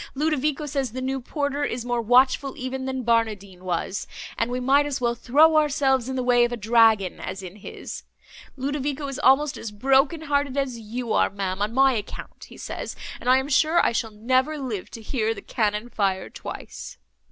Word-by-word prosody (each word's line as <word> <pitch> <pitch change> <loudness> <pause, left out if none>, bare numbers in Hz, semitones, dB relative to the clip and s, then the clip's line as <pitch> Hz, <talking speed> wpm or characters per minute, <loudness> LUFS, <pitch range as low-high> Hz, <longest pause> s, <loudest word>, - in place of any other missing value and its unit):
Ludovico 300 0 0
says 275 -4 -2
the 255 - -4
new 265 +1 -2
porter 285 +2 -2
is 245 -3 -3
more 240 -1 0
watchful 255 +3 +3
even 260 +1 -4
than 260 -1 -3
Barnardine 210 -5 0
was, 185 +2 -2 0.3
and 230 - -1
we 250 +1 -2
might 275 +3 +3
as 285 -1 -2
well 240 -1 +1
throw 300 +7 +4
ourselves 270 -4 +2
in 265 - -3
the 255 - -1
way 245 -1 +4
of 240 - +1
a 240 - -3
dragon, 220 -4 +3
as 190 +1 -6
in 185 +2 -9
his. 200 - -8 0.6
Ludovico 285 +1 -2
is 275 0 -5
almost 290 +1 +4
as 225 - -5
broken 270 +8 +2
hearted 285 -2 0
as 260 -4 -1
you 230 +2 -4
are, - - +3
ma'am, 195 -1 -3
on 210 +1 0
my 265 +2 +4
account, 210 -3 -6
he - - -14
says, - - -6 0.2
and 250 - -2
I 255 - +7
am 265 +1 -1
sure 310 +4 +3
I - - +3
shall 230 -1 -1
never 255 +8 0
live 245 -9 -4
to 225 - -10
hear 225 -1 -1
the 200 - -8
cannon 210 0 -1
fire 195 -5 -1
twice!" - - -8
255 Hz, 195 wpm, -24 LUFS, 225-275 Hz, 0.6 s, I